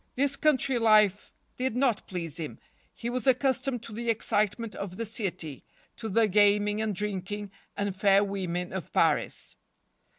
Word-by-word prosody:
This 280 +1 +3
country 275 -4 +2
life 215 -3 +4 0.3
did 255 -2 -1
not 250 -4 +1
please 170 -4 -5
him. 155 - -5 0.3
He 235 - -7
was 250 +2 -2
accustomed 260 -1 +1
to 230 - -9
the 235 +2 -3
excitement 215 0 0
of 190 -2 -6
the 230 - -3
city, 185 - -3 0.3
to 225 -2 -5
the 220 +2 +3
gaming 205 +1 +3
and 215 -2 -1
drinking 205 +1 -3 0.3
and 200 -2 -2
fair 195 +1 +4
women 185 -3 -3
of 190 -4 -5
Paris. - - +1
210 Hz, 155 wpm, -28 LUFS, 195-235 Hz, 0.3 s, life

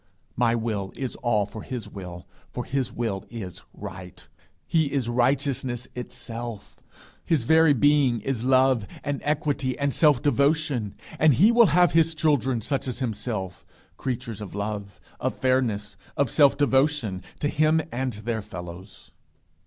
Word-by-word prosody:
My 120 -1 +2
will 110 -4 -2
is 130 -2 -4
all 110 -4 +1
for 105 +2 -9
his 125 0 -6
will, 90 -3 -9 0.2
for - - -5
his 135 -2 -1
will 110 -5 -3
is 105 -6 -7
right. 90 0 -9 0.4
He 160 -4 +1
is 135 -4 -1
righteousness 125 0 0
itself. 120 -2 -7 0.4
His 155 -7 +1
very 160 +3 +5
being 140 -2 +3
is 120 0 -2
love 130 -4 +3 0.2
and 145 -1 -2
equity 145 -3 -1
and 140 -1 0
self 150 -5 +4
devotion, 140 -5 +1 0.2
and 155 -4 +5
he 205 - +6
will 235 -2 +6
have 175 +2 +4
his 165 0 +3
children 135 -6 +1
such 135 +1 -2
as 125 - -3
himself 110 -6 -4 0.3
creatures 120 -5 -4
of 100 -1 -7
love, 100 -2 -4 0.2
of - - -1
fairness, 115 -6 0 0.2
of 140 -4 +1
self 145 -3 +5
devotion 135 -8 +1 0.2
to 145 - 0
him 155 +2 +3
and 130 +1 -2
their 110 +2 -3
fellows. 90 0 -10
125 Hz, 145 wpm, -25 LUFS, 110-145 Hz, 0.4 s, he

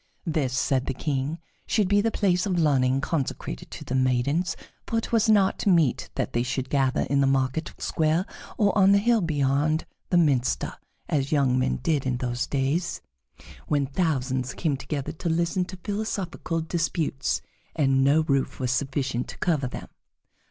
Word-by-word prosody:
This, 155 -6 0
said 130 0 +1
the 135 - -2
King, 145 +2 -2 0.3
should 210 -4 +2
be 205 +1 +4
the 225 - +1
place 190 -3 +1
of 185 -3 0
learning 135 -4 +2
consecrated 135 - -3
to - - -8
the - - -4
maidens, 130 +7 +1 0.3
for 230 - -1
it 225 - -2
was 225 -1 +3
not 205 -1 +3
meet 165 -9 +3
that - - -2
they 120 - +1
should 125 +1 -3
gather 135 -2 +2
in 140 0 +1
the 135 - +3
market 135 +3 0
square 160 +3 +1 0.3
or 205 -2 +2
on 195 -1 +6
the - - +6
hill 230 +2 +3
beyond 150 0 +1 0.2
the 175 - +3
minster, 140 -7 +2 0.3
as 140 -2 0
young 135 -4 +3
men 130 +1 +1
did 150 -5 +1
in 125 -1 0
those 125 0 -2
days 145 +6 -1 0.7
when 145 -2 +1
thousands 130 -4 -1
came 155 -5 0
together 135 +1 -4
to 170 - -4
listen 170 +3 +1
to 185 +1 -9
philosophical 195 -4 -3
disputes, 160 -4 -1 0.3
and 135 -3 +3
no 145 +4 +4
roof 140 -4 0
was 125 -2 0
sufficient 135 -2 -1
to - - -9
cover 155 -7 0
them. - - -7
145 Hz, 170 wpm, -26 LUFS, 130-175 Hz, 0.7 s, on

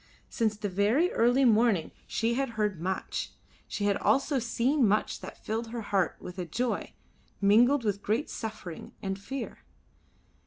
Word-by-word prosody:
Since 220 -3 0
the 210 - -2
very 210 - +2
early 245 +3 +4
morning 220 -7 +3 0.2
she 230 +1 0
had 270 +1 0
heard 205 -6 0
much, 190 +2 -3 0.3
she 205 - -2
had 200 -1 +2
also 275 0 +2
seen 245 +2 +2
much 210 +2 +1
that - - -10
filled 225 +2 -2
her 230 +1 -5
heart 195 -3 0
with 180 +1 -8
a 180 - -2
joy 240 +9 -2 0.5
mingled 240 +7 +5
with 200 -2 -1
great 220 +10 0
suffering 215 -7 -7
and 195 0 -2
fear. 270 +7 -6
220 Hz, 155 wpm, -29 LUFS, 200-245 Hz, 0.5 s, mingled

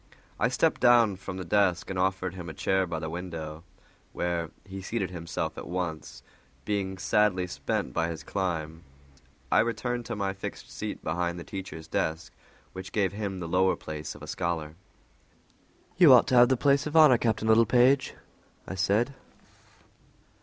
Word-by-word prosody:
I - - +3
stepped - - +1
down 120 -5 +5
from 95 -1 -7
the 90 - -5
desk 90 -2 +2
and 95 - -3
offered 95 -1 0
him 90 -2 -7
a 80 - -8
chair 95 +4 +1
by 85 -1 -3
the 80 0 -4
window, 80 -2 -6 0.5
where 85 -2 -2 0.2
he 95 -1 -8
seated 95 -1 -3
himself 85 -2 -4
at - - -8
once, 85 -3 -5 0.4
being 95 -2 -2
sadly 105 -2 +2
spent 90 - -3
by 85 0 0
his 80 -2 -6
climb. 80 -3 -3 0.7
I - - +5
returned 120 +1 -1
to - - -3
my 100 -2 -2
fixed 95 - -8
seat - - -6
behind 85 +2 -2
the 85 - -7
teacher's 95 -5 -8
desk, 80 +1 -2 0.4
which 95 0 -8
gave 100 -3 +1
him 100 -2 -4
the 85 - -5
lower 95 +2 +2
place 75 -1 -7
of - - -12
a - - -8
scholar. 80 -3 -3 1.2
"You 170 -6 +8
ought 125 - +7
to 130 - +2
have 120 0 +7
the 130 - +2
place 140 +2 +2
of 150 +2 0
honor, 150 -7 +7
Captain 110 -1 0
Littlepage," 125 +4 +4 0.5
I - - -5
said. 105 +7 +1
95 Hz, 165 wpm, -28 LUFS, 85-110 Hz, 1.2 s, You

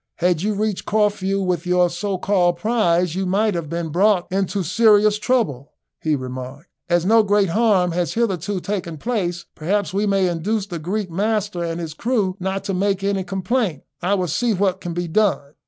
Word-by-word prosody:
"Had 175 -2 +1
you 210 +2 0
reached 210 -1 -2
Corfu 200 -2 +1
with 180 -1 -1
your 180 0 +4
so 185 +3 -3
called 180 -3 +2
prize, 180 -6 +1
you 190 +1 -2
might 205 +3 +1
have 170 -4 -4
been 170 0 -3
brought 185 +2 +3
into 195 0 -1
serious 210 +3 +4
trouble," 185 - -1 0.3
he 155 -1 +1
remarked. 130 +4 -7 0.2
"As 175 0 +2
no 225 +3 +5
great 205 -2 +2
harm 195 -3 +2
has 175 0 -1
hitherto 200 -4 -1
taken 175 -5 -4
place, 175 -4 -2
perhaps 190 +4 -1
we 205 +2 +1
may 195 -2 +2
induce 190 +5 -1
the 175 -4 -6
Greek 185 +3 -3
master 205 -1 -1
and 165 0 -3
his 165 -2 -5
crew 205 -1 0
not 190 +1 -2
to 195 - -3
make 195 +1 0
any 195 -1 0
complaint. 190 - -1 0.2
I 190 +3 +1
will 185 -2 -1
see 225 - 0
what 190 -1 0
can 170 -1 -5
be 175 0 -2
done." 165 -6 +1
190 Hz, 190 wpm, -21 LUFS, 175-210 Hz, 0.3 s, no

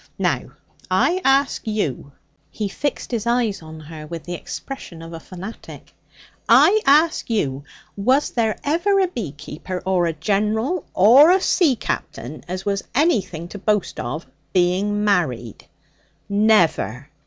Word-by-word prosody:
Now - - 0 0.4
I 370 +2 +2
ask 270 +1 +2
you' 150 - -2 0.4
he 210 - -3
fixed 285 +7 -3
his 235 -1 -2
eyes 235 -5 +1
on 160 0 -10
her 155 0 -10
with 165 0 -7
the 175 - -6
expression 175 -2 -8
of 165 0 -9
a 165 - -6
fanatic 185 +6 -10 0.6
'I 430 +2 +6
ask 305 +2 +4
you, 140 - -1 0.3
was 255 +8 +2
there 225 -3 0
ever 345 +7 +2
a 380 - +3
beekeeper 180 - -6
or 185 -2 +2
a 165 - -1
general 215 - -1
or 245 - +7
a 370 +2 +5
sea 335 -7 +3
captain 145 - -5
as 185 +1 -5
was 200 -1 -1
anything 215 - +1
to 205 - -8
boast 210 -1 0
of, 140 +7 -4 0.3
being 195 +3 +1
married? 130 - -1 0.6
Never! 175 - +2
200 Hz, 140 wpm, -21 LUFS, 165-250 Hz, 0.6 s, or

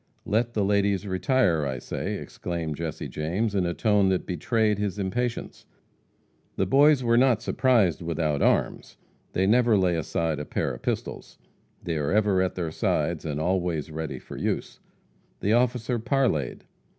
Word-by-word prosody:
"Let 115 +3 0
the 105 -2 +1
ladies 100 -1 +1
retire, 95 - +1
I 65 -2 -2
say!" - - -4
exclaimed 85 -3 -5
Jesse 80 -2 -4
James, 95 +8 -2
in 95 -3 +1
a 85 - -2
tone 105 -3 +3
that 95 -1 0
betrayed 105 +4 0
his 105 -2 -2
impatience. 115 +5 -3 0.9
The - - +1
Boys 140 0 +5
were 115 0 +3
not 120 -3 +3
surprised 115 - +2
without 80 -3 -1
arms. - - 0 0.4
They 95 - +1
never 115 +1 +4
lay 90 -2 +2
aside 80 0 -1
a 75 - -4
pair - - -2
of - - -9
pistols. - - -4 0.5
They 85 -2 -2
are 75 -1 -1
ever 100 -3 +3
at 95 - -1
their 85 -3 -3
sides, - - -1
and 75 -2 -3
always 85 -2 -1
ready 80 -1 -4
for - - -10
use. - - -3 0.6
The 105 - +1
officer 120 0 +1
parleyed. 115 - 0
95 Hz, 160 wpm, -26 LUFS, 80-115 Hz, 0.9 s, Boys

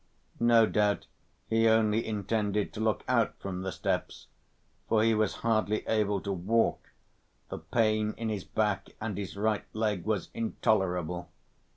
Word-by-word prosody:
No 115 -1 +6
doubt 105 -1 +1 0.4
he 115 0 +3
only 110 0 +3
intended 105 -1 -1
to 110 - -7
look 110 -1 0
out 120 -3 +1
from 95 -2 -5
the 95 0 -3
steps, - - -3 0.6
for 110 -1 +3
he 115 0 +4
was 110 0 +1
hardly 110 -2 +1
able 105 -2 +1
to 100 - -3
walk, 105 +6 0 0.6
the - - -5
pain 110 -2 +1
in 115 - -3
his 105 -4 -2
back 105 -3 -1
and 105 -2 -3
his 100 0 -5
right 110 0 0
leg 105 -5 -1
was 110 -1 -2
intolerable. 90 -6 0
110 Hz, 150 wpm, -29 LUFS, 100-110 Hz, 0.6 s, No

